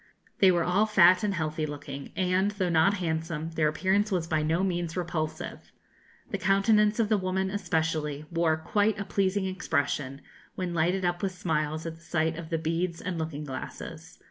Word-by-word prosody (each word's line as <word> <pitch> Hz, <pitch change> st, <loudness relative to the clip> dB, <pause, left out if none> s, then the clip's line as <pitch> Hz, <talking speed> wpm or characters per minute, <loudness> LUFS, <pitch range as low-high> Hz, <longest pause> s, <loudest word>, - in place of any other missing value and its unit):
They 190 Hz, -, +7 dB
were 175 Hz, -2 st, +3 dB
all 195 Hz, +5 st, +2 dB
fat 185 Hz, -3 st, +6 dB
and 200 Hz, -2 st, 0 dB
healthy 155 Hz, -2 st, -2 dB
looking, 140 Hz, -1 st, -7 dB
and, 185 Hz, +1 st, +2 dB
though 200 Hz, -3 st, -1 dB
not 165 Hz, +5 st, +4 dB
handsome, 165 Hz, -2 st, -3 dB
their 160 Hz, -1 st, +1 dB
appearance 190 Hz, +7 st, +1 dB
was 180 Hz, -3 st, 0 dB
by 160 Hz, -2 st, 0 dB
no 160 Hz, +4 st, +1 dB
means 175 Hz, -2 st, -1 dB
repulsive; 160 Hz, -3 st, -4 dB, 0.6 s
the 200 Hz, -, -2 dB
countenance 210 Hz, +3 st, +3 dB
of 225 Hz, -, +3 dB
the 215 Hz, -1 st, +2 dB
woman, 190 Hz, +1 st, -1 dB
especially, 160 Hz, -6 st, -1 dB
wore 165 Hz, -2 st, +2 dB
quite 205 Hz, +6 st, +1 dB
a 200 Hz, -, -3 dB
pleasing 195 Hz, 0 st, 0 dB
expression, 145 Hz, -7 st, -1 dB, 0.3 s
when 180 Hz, -2 st, -3 dB
lighted 175 Hz, +3 st, +1 dB
up 175 Hz, 0 st, 0 dB
with 195 Hz, -2 st, -1 dB
smiles 155 Hz, -3 st, -2 dB
at 165 Hz, -1 st, -5 dB
the -, -, -21 dB
sight 160 Hz, -1 st, 0 dB
of 165 Hz, -1 st, -7 dB
the 165 Hz, -, 0 dB
beads 165 Hz, +2 st, -1 dB
and 180 Hz, -2 st, -4 dB
looking 155 Hz, -2 st, -4 dB
glasses. 135 Hz, -3 st, -7 dB
170 Hz, 180 wpm, -28 LUFS, 160-190 Hz, 0.6 s, They